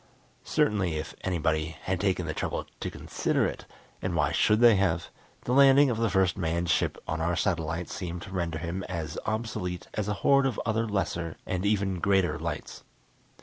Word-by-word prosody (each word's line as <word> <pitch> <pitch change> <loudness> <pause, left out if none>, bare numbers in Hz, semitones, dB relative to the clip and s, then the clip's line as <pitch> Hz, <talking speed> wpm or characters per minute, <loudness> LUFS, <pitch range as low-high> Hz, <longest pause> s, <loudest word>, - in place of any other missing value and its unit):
Certainly 95 -6 +1
if 75 0 -4
anybody 80 -3 -1
had 95 -2 -1
taken 95 -2 +1
the - - -2
trouble - - -3
to - - -3
consider - - -1
it - - -5 0.3
and 95 -2 -2
why 75 -4 +2
should 105 0 +3
they 120 -2 +7
have? 85 -4 0 0.3
the - - -3
landing 140 0 +7
of 115 - -2
the 115 -1 +2
first 95 -1 +2
manned 85 0 0
ship - - +1
on 80 0 -2
our 85 +1 +1
satellite 85 0 -1
seemed 90 -1 -5
to 95 - -10
render 85 -4 -2
him 85 +4 -4
as 80 -3 -4
obsolete 110 -5 -3
as 105 -2 -2
a 105 - 0
horde 140 -1 +5
of 125 - -3
other 115 0 0
lesser 85 -5 -2
and 95 +2 -1
even 100 -3 +1
greater 95 -4 +2
lights. - - -5
90 Hz, 185 wpm, -28 LUFS, 85-105 Hz, 0.3 s, they